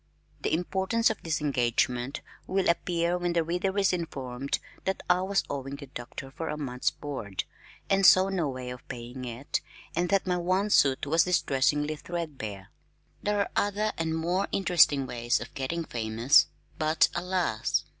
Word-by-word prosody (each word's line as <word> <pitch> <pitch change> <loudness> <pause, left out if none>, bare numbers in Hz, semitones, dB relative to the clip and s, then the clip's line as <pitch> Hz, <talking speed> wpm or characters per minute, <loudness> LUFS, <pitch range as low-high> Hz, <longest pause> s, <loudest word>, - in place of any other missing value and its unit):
The - - -1
importance 190 +7 +1
of 220 - -6
this 160 -2 -1
engagement 125 -1 0 0.3
will 190 0 +1
appear 170 +1 +1
when 175 -1 0
the 170 -1 +2
reader 180 +4 -1
is 195 -2 +3
informed 140 -6 -3 0.3
that 190 - -1
I 180 0 +4
was 195 +1 +1
owing 140 0 -4
the 140 0 -9
Doctor 135 +1 -8
for 160 +3 -5
a 150 - -3
month's 130 -4 -1
board, 115 -10 -5 0.4
and 195 0 +2
saw 190 0 +7
no 175 -6 0
way 130 -1 -5
of 125 - -10
paying 125 +2 -7
it, 120 +3 -3 0.3
and 175 +1 +1
that 195 -1 +2
my 180 -1 +1
one 185 +4 +1
suit 135 -6 +4
was 165 +3 +3
distressingly 150 -3 +1
threadbare. 135 - -5 0.5
There 205 0 +1
are - - -1
other 205 +1 +1
and 160 -1 -1
more 175 +4 0
interesting 170 -8 +4
ways 120 -1 0
of 120 - -8
getting 165 +5 -3
famous 115 +4 +3 0.3
but 155 0 +4
alas! 175 - 0
160 Hz, 165 wpm, -28 LUFS, 130-180 Hz, 0.5 s, saw